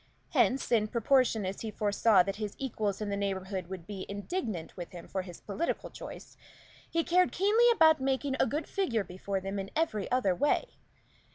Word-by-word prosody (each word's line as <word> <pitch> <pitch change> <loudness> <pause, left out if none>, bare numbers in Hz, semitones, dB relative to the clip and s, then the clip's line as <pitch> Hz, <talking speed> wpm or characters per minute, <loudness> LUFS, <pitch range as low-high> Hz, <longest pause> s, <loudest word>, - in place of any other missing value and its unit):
Hence, 265 0 +2
in 220 -3 +3
proportion 235 -2 +2
as 190 +1 -4
he 225 - -3
foresaw 210 -1 +3
his 205 +1 -4
equals 215 -6 -2
in 210 - -2
the 200 - -1
neighborhood 190 -2 -3
would 185 -2 -7
be 195 -1 -6
indignant 205 - -4
with 175 -1 -8
him 175 -1 -9
for 190 - -2
his 180 -2 -10
political 215 +12 -3
choice, - - -10 0.5
he 330 0 +1
cared 360 +2 +3
keenly 430 +6 +4
about 320 - +5
making 265 +1 0
a - - +4
good 300 +6 -2
figure 250 - 0
before 190 +2 -4
them 195 +1 -4
in 195 0 -5
every 305 -11 0
other 245 -7 +2
way. 290 - 0
210 Hz, 180 wpm, -30 LUFS, 195-275 Hz, 0.5 s, about